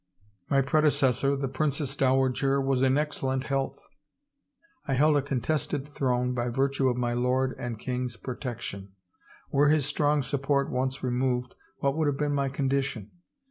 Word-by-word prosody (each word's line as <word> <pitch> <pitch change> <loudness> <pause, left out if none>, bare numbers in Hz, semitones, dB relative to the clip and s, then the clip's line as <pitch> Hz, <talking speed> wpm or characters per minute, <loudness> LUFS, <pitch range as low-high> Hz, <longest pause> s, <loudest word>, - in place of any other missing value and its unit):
My 135 -1 +3
predecessor, 140 -2 +2
the 135 0 -2
Princess 140 +1 -1
Dowager, 135 +1 +2
was 135 -1 +1
in 135 +1 +3
excellent 135 -3 -1
health. 135 0 -3 1.0
I 135 - +1
held 150 +3 +4
a 145 - +3
contested 140 +1 -2
throne 125 -3 0
by 120 0 -1
virtue 135 +1 +1
of 125 - -1
my 120 -1 0
lord 125 +2 +1
and 120 -2 -4
king's 125 +1 -3
pro 125 - -5
tection. 100 -7 -6 0.6
Were 145 0 +4
his 150 -3 +3
strong 145 0 +1
support 140 +2 0
once 130 +1 -2
removed 125 0 0 0.3
what 140 0 +1
would 155 -1 +1
have 140 -1 0
been 145 0 0
my 140 -1 0
condition? 135 -5 -2
135 Hz, 155 wpm, -27 LUFS, 125-140 Hz, 1.0 s, held